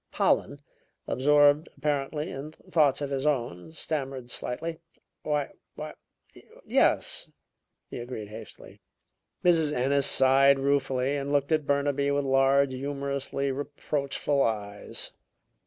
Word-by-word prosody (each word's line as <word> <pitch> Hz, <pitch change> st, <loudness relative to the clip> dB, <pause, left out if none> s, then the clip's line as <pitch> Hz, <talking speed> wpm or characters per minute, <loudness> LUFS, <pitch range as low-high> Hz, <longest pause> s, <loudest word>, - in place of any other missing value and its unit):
Pollen, 145 Hz, 0 st, +1 dB, 0.4 s
absorbed 145 Hz, +3 st, +4 dB
apparently 150 Hz, +2 st, -2 dB
in 145 Hz, +3 st, -7 dB
thoughts 155 Hz, -6 st, +1 dB
of 140 Hz, -1 st, -3 dB
his 135 Hz, +1 st, -1 dB
own 120 Hz, -, -1 dB
stammered 135 Hz, -5 st, -4 dB
slightly. 165 Hz, +6 st, -3 dB, 0.4 s
"Why 150 Hz, -2 st, -1 dB, 0.2 s
why, -, -, -6 dB, 0.7 s
yes," -, -, +2 dB, 0.6 s
he -, -, -7 dB
agreed 120 Hz, -4 st, -6 dB
hastily. 105 Hz, -, -11 dB, 0.6 s
Mrs. 165 Hz, -4 st, +4 dB
Ennis 140 Hz, +1 st, +2 dB
sighed 135 Hz, +1 st, +5 dB
ruefully 135 Hz, -1 st, +1 dB
and 140 Hz, 0 st, -3 dB
looked 145 Hz, +1 st, +1 dB
at 155 Hz, -2 st, +1 dB
Burnaby 140 Hz, 0 st, +1 dB
with 140 Hz, 0 st, 0 dB
large, 135 Hz, 0 st, +3 dB
humorously 140 Hz, 0 st, -2 dB
reproachful 140 Hz, 0 st, -2 dB
eyes. 105 Hz, -4 st, -3 dB
140 Hz, 110 wpm, -27 LUFS, 135-145 Hz, 0.7 s, sighed